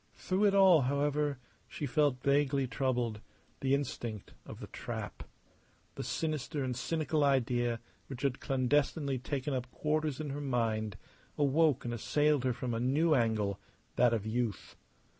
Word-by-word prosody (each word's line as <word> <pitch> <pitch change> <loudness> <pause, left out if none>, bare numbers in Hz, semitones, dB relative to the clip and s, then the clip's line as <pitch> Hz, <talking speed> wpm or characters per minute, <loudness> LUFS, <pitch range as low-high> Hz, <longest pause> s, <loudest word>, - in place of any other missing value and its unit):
Through 190 +3 0
it 200 -1 +4
all, 190 -5 +7
however, 145 +2 0 0.3
she 150 - -5
felt 140 -2 +1
vaguely 140 -1 +2
troubled; 120 -4 -1 0.4
the 135 0 +2
instinct 120 -6 -4
of - - -9
the - - -6
trap. - - -6 0.7
The - - -5
sinister 155 -2 -2
and 130 -1 -2
cynical 155 +3 0
idea 120 -4 +1 0.3
which 135 0 -7
had 135 -2 0
clandestinely 140 +1 +1
taken 135 +2 -3
up 130 -1 -3
quarters 150 0 -1
in 150 -2 -3
her 145 +1 -4
mind 115 -6 -1 0.4
awoke 145 -1 +3
and 120 - -2
assailed 145 +3 +1
her 130 - +3
from 120 0 -3
a 115 - -1
new 145 +7 +2
angle, 110 -6 +1 0.4
that 125 -1 +4
of 110 -3 -1
youth. 110 -2 -2
135 Hz, 150 wpm, -32 LUFS, 120-150 Hz, 0.7 s, all